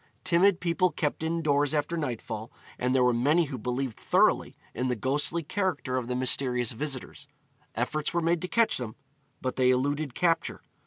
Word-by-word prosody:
Timid 185 +1 +4
people 180 +1 +2
kept 150 -3 -2
indoors 155 -3 +1
after 150 +3 -1
nightfall, 120 -7 -4 0.3
and 125 +1 +1
there 130 - +4
were 125 -1 +4
many 150 +8 +3
who 135 -3 -6
believed 125 0 -3
thoroughly - - +2 0.2
in 125 +3 -2
the 125 - 0
ghostly 145 +8 0
character 170 -7 -2
of 125 -2 -2
the 125 - -2
mysterious 125 -2 +2
visitors. 140 +2 -5 0.5
Efforts 150 +6 -1
were 170 - 0
made 170 0 +1
to 180 - -3
catch 230 +3 +2
them, 115 -4 -5 0.5
but 130 -1 -2
they 130 -1 +4
eluded 140 +2 0
capture. 165 -2 0
140 Hz, 170 wpm, -28 LUFS, 125-165 Hz, 0.5 s, Timid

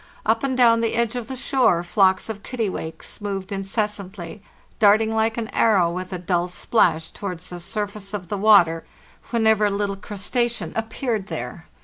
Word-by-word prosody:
Up 225 +1 +2
and 260 -2 0
down 230 -2 +5
the 230 -1 0
edge 235 0 0
of 240 -3 -4
the 265 - -5
shore 250 -9 +2
flocks 190 +1 +2
of 215 -2 -6
kittiwakes 210 -8 -4
moved 195 -1 -4
inces 200 +2 -1
santly, 190 0 -9 0.4
darting 220 +1 +5
like 220 +1 +1
an 230 -1 -2
arrow, 190 -7 +3
with 185 +2 -5
a 185 - -3
dull 175 0 0
splash, 170 -4 +1
towards 180 -3 -6
the 175 - -6
surface 200 +1 -4
of 195 -4 -5
the 205 - -3
water, 185 -6 +5 0.5
whenever 220 -3 +3
a - - +3
little 200 0 -1
crustacean 205 -1 -2
ap 225 0 -2
peared 225 -6 -2
there. - - -6
205 Hz, 175 wpm, -23 LUFS, 185-225 Hz, 0.5 s, down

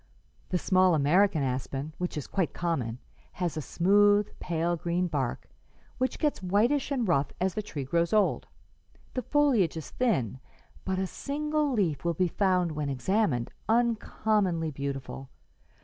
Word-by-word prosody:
The 180 - +1
small 185 0 +3
American 160 +3 +3
aspen, 135 +3 -3
which 180 -2 -3
is 145 - -4
quite 190 -4 -2
common, 135 -10 -2 0.4
has 175 -3 -2
a 155 - -2
smooth, 205 +7 +4
pale 170 0 -1
green 170 +2 -1
bark, 140 -8 -2 0.5
which 255 -1 0
gets 300 -8 0
whitish 215 +10 +2
and 255 -6 0
rough 140 -5 +2
as 185 0 0
the 215 - -2
tree 150 -9 -5
grows 170 +5 0
old. 210 -2 +2 0.7
The 255 - -1
foliage 245 - +2
is 160 - -7
thin, 135 - 0 0.5
but 190 -1 -1
a 190 - 0
single 300 +6 -1
leaf 175 - 0
will 170 -1 0
be 180 +2 +1
found, 180 -2 +1
when 150 -2 -3
examined, 140 - 0 0.2
uncommonly 215 -7 +1
beautiful. 135 -1 -5
180 Hz, 150 wpm, -28 LUFS, 150-210 Hz, 0.7 s, smooth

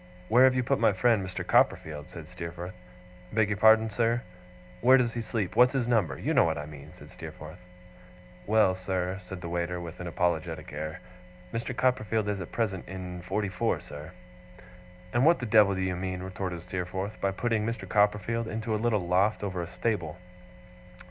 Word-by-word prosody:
'Where 125 +4 +7
have 130 -1 +4
you 125 - +1
put 135 +2 +1
my - - +4
friend, 110 0 +3
Mr. 95 0 -5
Copperfield?' 75 -2 +1
said - - -9
Steerforth. 85 +2 -7 0.6
'Beg 110 -1 +2
your 105 - -1
pardon, 110 +1 +6
sir?' 115 +3 +1 0.6
'Where 130 +2 +7
does 120 -3 +1
he 120 - -3
sleep? 110 -4 -3
What's 125 +2 +6
his 130 -3 0
number? 100 - +1
You - - -1
know - - +6
what 80 -1 0
I 75 - -4
mean,' 75 -2 -11
said - - -13
Steerforth. - - -10 0.9
'Well, 105 -3 +4
sir,' 95 0 -2
said 90 0 -8
the 85 - -5
waiter, 85 +1 -2
with 85 0 -8
an 90 - -5
apologetic 80 -3 -2
air. 80 +4 -5 0.5
'Mr. 115 +2 -3
Copperfield 115 -4 +1
is 100 -2 -2
at 90 - -7
present 100 -6 -2
in 90 -1 -6
forty 100 +3 -2
four, 90 - 0
sir.' 75 +3 -9 1.0
'And 120 - +3
what 170 +3 +6
the 120 - -4
devil 105 -3 +5
do 95 - -2
you 95 -1 -1
mean,' 90 0 -4
retorted 90 -2 -5
Steerforth, 90 +3 -4
'by 100 - +2
putting 110 +3 0
Mr. 110 -3 -3
Copperfield 105 +3 +1
into 110 0 -3
a 105 - -1
little 110 -6 +1
loft 95 +5 +2
over 95 -3 -2
a 85 - -4
stable? 90 -4 -2
95 Hz, 190 wpm, -28 LUFS, 90-115 Hz, 1.0 s, Where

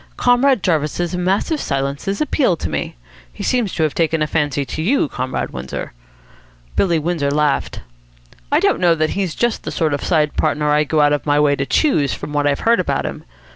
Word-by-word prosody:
Comrade 245 -2 +3
Jarvis's 165 +1 0
massive 195 - 0
silences 140 - -2
appeal 265 - +1
to 85 - -4
me. 75 -1 -3 0.4
He - - -8
seems 240 -6 0
to 160 - 0
have 155 - 0
taken 160 -1 +1
a - - +1
fancy 145 -2 -1
to 155 - -5
you, 225 - +2
Comrade 130 -1 -3
Windsor." 65 +1 -6 0.8
Billy 170 -4 +2
Windsor 160 -2 -1
laughed. 140 -8 0 0.7
"I - - +4
don't - - +2
know 175 -2 +4
that 155 -1 0
he's 190 -5 -2
just 240 -1 0
the - - -5
sort 155 -3 0
of 145 - -2
side 155 -4 +1
partner 150 0 +1
I'd 150 0 +2
go 155 -1 +3
out 145 0 +4
of 145 - -2
my 145 0 +3
way 145 -1 +3
to 140 -1 -3
choose, 155 - +2
from 150 0 -7
what 145 0 +1
I've 140 -1 0
heard 230 -2 +3
about 185 - -1
him. - - -6
155 Hz, 205 wpm, -19 LUFS, 145-185 Hz, 0.8 s, I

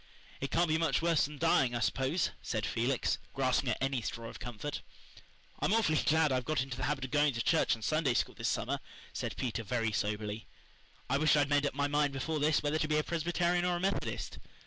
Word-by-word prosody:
"It 135 - -3
can't 170 +1 +2
be 160 0 +1
much 165 -2 +1
worse 170 -2 +3
than 150 +1 -8
dying, 135 -6 +3
I - - 0
s'pose," 135 +8 0
said 110 -3 -2
Felix, 120 +2 0 0.2
grasping 130 -1 +1
at 110 - 0
any 135 -2 0
straw 115 +1 -5
of - - -10
comfort. 120 +4 -5 0.8
"I'm - - +1
awful 215 -9 +2
glad 160 -1 +4
I've 130 -1 +1
got 155 +3 -1
into 135 -2 -6
the 125 0 -2
habit 135 -1 -1
of 130 - -9
going 145 -1 +3
to 115 - -2
church - - +3
and 110 - -11
Sunday 155 -5 +1
School - - 0
this - - -2
summer," - - -1 0.3
said - - -4
Peter 125 -2 -2
very 115 +1 -1
soberly. 105 0 -2 0.6
"I 140 +2 +1
wish 155 -1 +4
I'd 145 -1 +2
made 145 0 +3
up 140 - -5
my 145 0 +1
mind 145 -1 +1
before 150 +4 -2
this 150 +2 +2
whether 150 +1 0
to 155 - 0
be 155 0 +1
a 150 - +2
Presbyterian 175 +2 0
or 180 0 +1
a - - -2
Methodist. 195 +2 -2
145 Hz, 225 wpm, -32 LUFS, 125-155 Hz, 0.8 s, glad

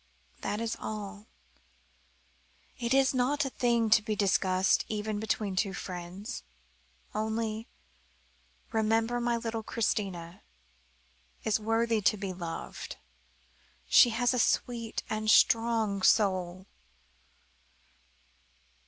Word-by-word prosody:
That 205 +1 -3
is 230 -1 -2
all. 210 0 -6 1.5
It 235 -1 -2
is 270 0 +4
not 265 +3 +1
a 270 - -3
thing 235 -3 +1
to 215 - +7
be 215 0 -2
discussed, 190 -2 +2
even 215 0 -3
between 210 -2 -2
two 195 +1 0
friends. 180 +2 -6 0.7
Only 220 +1 -2 1.0
remember 225 +2 +1
that - - -2
my 235 0 +1
little 230 -1 -3
Christina 190 -6 -2 1.0
is 220 -1 +1
worthy 225 0 +1
to 210 - +3
be 195 -2 -4
loved. 170 -2 -6 0.9
She 240 - +7
has 245 +2 +1
a 250 - 0
sweet 230 -1 0
and 215 0 -3
a - - +1
strong 225 -3 +4
soul." 185 -3 +2
215 Hz, 110 wpm, -30 LUFS, 200-230 Hz, 1.5 s, to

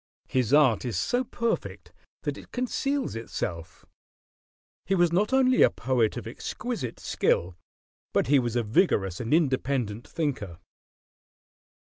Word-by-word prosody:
His 130 -2 0
art 140 -7 +5
is 120 -4 -2
so 245 +1 +1
perfect 235 -1 -3 0.3
that - - -2
it - - -13
conceals 275 - -1
itself. 85 -7 -5 1.0
He 195 - +2
was 175 -2 +3
not 200 +7 +1
only 260 -1 +4
a - - +7
poet 120 -3 0
of - - -6
exquisite 125 - -5
skill, 85 +1 0 0.6
but - - +2
he 140 +2 +4
was 120 -2 -2
a 120 - +2
vigorous 105 - +1
and 115 -1 -4
independent 130 -7 0
thinker. 125 - -3
130 Hz, 130 wpm, -27 LUFS, -, 1.0 s, a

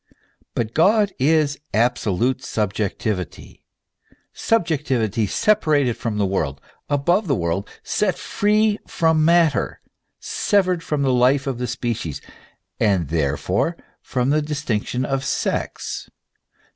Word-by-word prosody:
But 115 -1 -2
God 200 +4 +3
is 145 +1 +2 0.2
absolute 120 +2 +1
subjectivity, 105 -2 -3 0.7
subjectivity 135 - 0
separated 150 - +2
from 110 -3 -3
the 105 - +2
world, 70 -8 -1 0.3
above 175 +8 +2
the 140 - +2
world, 85 +1 -2
set 200 -4 0
free 210 +1 +1
from 160 -2 +2
matter, 165 -4 +3 0.4
severed 185 -4 +1
from 150 -3 -1
the 130 -2 +2
life 130 +3 +3
of 135 -3 -3
the 125 - -2
species, 115 - -3 0.6
and 95 -8 +2
therefore 85 - 0 0.2
from 125 +1 -1
the 155 +1 +3
distinction 130 -5 -2
of 135 0 -1
sex. - - -3
135 Hz, 110 wpm, -22 LUFS, 110-160 Hz, 0.7 s, God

